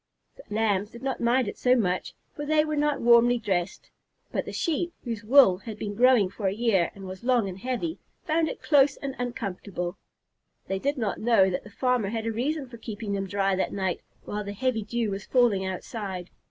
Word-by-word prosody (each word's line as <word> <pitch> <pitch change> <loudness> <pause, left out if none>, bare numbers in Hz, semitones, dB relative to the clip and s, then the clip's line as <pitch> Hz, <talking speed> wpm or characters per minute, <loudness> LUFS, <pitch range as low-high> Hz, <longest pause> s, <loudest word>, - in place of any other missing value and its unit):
The - - -12
Lambs 210 -2 +1
did 235 +2 -12
not 270 -1 -2
mind 240 0 +2
it - - -6
so 250 0 +4
much, 185 -6 -1 0.2
for 295 - -5
they 305 +1 +3
were 305 0 -2
not 295 0 +1
warmly 240 +1 +6
dressed, 195 -5 -2 0.4
but - - -2
the - - -6
Sheep, 340 +1 -1
whose 230 -3 -4
wool 220 -6 +6
had 215 0 -8
been 205 -1 -4
growing 245 -2 +5
for 195 +2 -3
a 190 - +1
year 205 -6 +2
and 195 -1 -9
was 185 +3 -8
long 245 -4 +2
and 190 0 -7
heavy, 260 - -3 0.2
found 320 +1 +1
it - - -4
very - - -16
close 285 -2 +5
and 275 -1 -5
uncomfortable. 200 -6 -4 0.7
They 195 0 -2
did 285 +6 -1
not 220 -5 -2
know 215 -5 +4
that 180 - -3
the - - -12
farmer 245 -1 0
had 225 0 -3
a 225 - 0
reason 270 +5 -2
for 240 -1 -11
keeping 215 -2 -5
them 195 -1 -2
dry 195 0 +1
that 185 - -1
night 190 -3 -1 0.2
while 210 0 -3
the 200 0 -5
heavy 240 +1 0
dew 230 0 -2
was 195 +1 -5
falling 225 -7 +3
outside. 190 -1 -5
225 Hz, 215 wpm, -27 LUFS, 195-255 Hz, 0.7 s, warmly